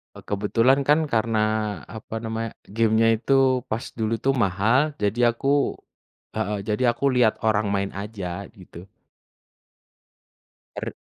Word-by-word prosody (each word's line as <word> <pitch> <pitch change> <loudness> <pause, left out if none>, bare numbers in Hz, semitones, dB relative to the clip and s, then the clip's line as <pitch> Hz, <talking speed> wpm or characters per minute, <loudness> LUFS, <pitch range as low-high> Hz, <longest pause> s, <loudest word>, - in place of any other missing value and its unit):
Eee, - - -11
kebetulan 115 +7 +1
kan 150 0 +3
karena 115 -1 +1 0.5
apa 110 0 -9
namanya, 115 0 -4 0.2
game-nya 110 +1 +3
itu 130 - -2 0.3
pas 115 -1 -3 0.2
dulu 110 0 0
itu 130 +4 0
mahal, 120 +5 +2
jadi 120 +3 +2
aku 140 +3 +1 0.6
heeh, 105 +1 -2
jadi 105 +3 -1
aku 120 - -5
lihat 120 -3 +3
orang 105 -1 +2
main 100 0 -1
aja 100 -2 -5
gitu. 90 -2 -14 1.9
Er - - -5
110 Hz, 125 wpm, -24 LUFS, 105-120 Hz, 1.9 s, kan